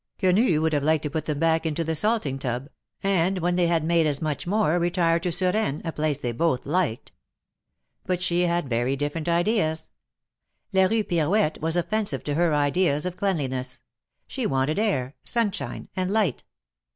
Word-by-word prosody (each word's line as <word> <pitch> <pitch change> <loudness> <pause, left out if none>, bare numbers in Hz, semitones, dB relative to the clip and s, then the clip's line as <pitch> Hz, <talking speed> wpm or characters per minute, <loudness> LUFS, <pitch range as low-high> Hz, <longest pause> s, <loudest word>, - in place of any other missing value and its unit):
Qiienii 185 -2 +3
would 160 0 +1
have 145 - +2
liked 155 +1 +2
to 150 - -3
put 160 0 -3
them 150 -2 -2
back 165 +1 +2
into 160 0 -1
the 160 0 -1
salting 155 - 0
tub, 130 +1 -3 0.3
and 190 -1 +2
when 175 0 0
they 175 -1 +2
had 165 -2 +1
made 165 0 +2
as 145 -2 0
much 155 +1 -3
more, 190 -4 +2
retire 170 -1 +2
to 180 - -2
Suresnes, 180 -3 0
a 165 - -1
place 150 -2 -1
they 125 -4 -3
both 130 +1 0
liked.. 155 -6 -1 1.0
But 180 -1 0
she 175 -1 +1
had 170 -3 0
very 120 +2 0
different 145 +4 -3
ideas. 170 -3 +1 0.8
La 190 -1 +5
Kue 220 +1 0
Pirouette 165 0 +1
was 165 +2 +1
offensive 175 -4 0
to 145 - -2
her 170 +2 +2
ideas 150 +1 +1
of 180 -1 -3
cleanliness. 135 -10 -2 0.4
She - - -3
wanted 135 +5 0
air, 140 - 0
sunshine 230 -5 -2
and 185 0 -1
light. 200 - 0
165 Hz, 175 wpm, -25 LUFS, 145-185 Hz, 1.0 s, La